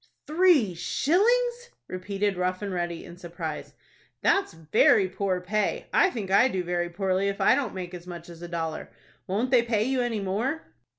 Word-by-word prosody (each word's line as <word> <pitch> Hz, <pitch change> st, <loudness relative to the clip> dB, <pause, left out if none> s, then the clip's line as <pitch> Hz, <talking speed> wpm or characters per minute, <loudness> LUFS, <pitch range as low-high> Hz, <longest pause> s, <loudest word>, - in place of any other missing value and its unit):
"Three 310 Hz, -, +4 dB
shillings!" 475 Hz, -, +1 dB, 0.2 s
repeated 195 Hz, +2 st, -2 dB
Rough 185 Hz, +2 st, -2 dB
and 200 Hz, -2 st, -3 dB
Ready, 175 Hz, -1 st, -3 dB
in 175 Hz, 0 st, -11 dB
surprise. 170 Hz, -3 st, -6 dB, 0.5 s
"That's 395 Hz, -, +2 dB
very 165 Hz, +4 st, +3 dB
poor 185 Hz, -1 st, -2 dB
pay. 210 Hz, +4 st, -1 dB
I -, -, +5 dB
think 205 Hz, -, -5 dB
I 200 Hz, +6 st, +6 dB
do 190 Hz, -8 st, -2 dB
very 175 Hz, 0 st, -1 dB
poorly 190 Hz, +2 st, 0 dB
if 200 Hz, 0 st, -2 dB
I -, -, +5 dB
don't 260 Hz, -8 st, -1 dB
make 180 Hz, -1 st, -6 dB
as 180 Hz, 0 st, -9 dB
much 170 Hz, -2 st, -8 dB
as 170 Hz, -1 st, -12 dB
a 175 Hz, -, -6 dB
dollar. 165 Hz, -2 st, -4 dB, 0.4 s
Won't 220 Hz, +7 st, -1 dB
they 250 Hz, -3 st, +6 dB
pay 225 Hz, -3 st, 0 dB
you 260 Hz, +2 st, 0 dB
any 240 Hz, -3 st, -1 dB
more?" 225 Hz, +11 st, -2 dB
195 Hz, 180 wpm, -26 LUFS, 175-245 Hz, 0.5 s, I